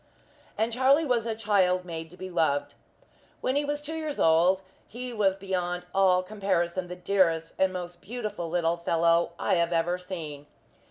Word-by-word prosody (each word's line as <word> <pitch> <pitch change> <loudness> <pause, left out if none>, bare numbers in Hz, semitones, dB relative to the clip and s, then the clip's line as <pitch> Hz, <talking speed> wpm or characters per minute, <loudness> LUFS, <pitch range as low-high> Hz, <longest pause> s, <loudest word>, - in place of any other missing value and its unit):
And 225 +1 0
Charlie 270 +6 +4
was 240 -4 +1
a 225 - -1
child 190 -4 +2
made 165 -2 -6
to 180 - -15
be 185 0 -7
loved. 145 -4 +1 0.7
When 260 - -1
he 290 - +2
was 290 0 -2
two 305 +2 -4
years 310 -2 -4
old 175 +4 +4 0.2
he 245 +1 -6
was 200 -4 +2
beyond 180 -2 -3
all 185 -1 +4
comparison 185 -3 -1
the 180 - -6
dearest 175 -3 +1
and 190 0 +3
most 175 -1 -7
beautiful 210 -6 -5
little 170 0 +1
fellow 170 0 +2
I - - +1
have 170 0 +1
ever 175 +2 +1
seen. 155 -6 -7
180 Hz, 170 wpm, -27 LUFS, 170-215 Hz, 0.7 s, Charlie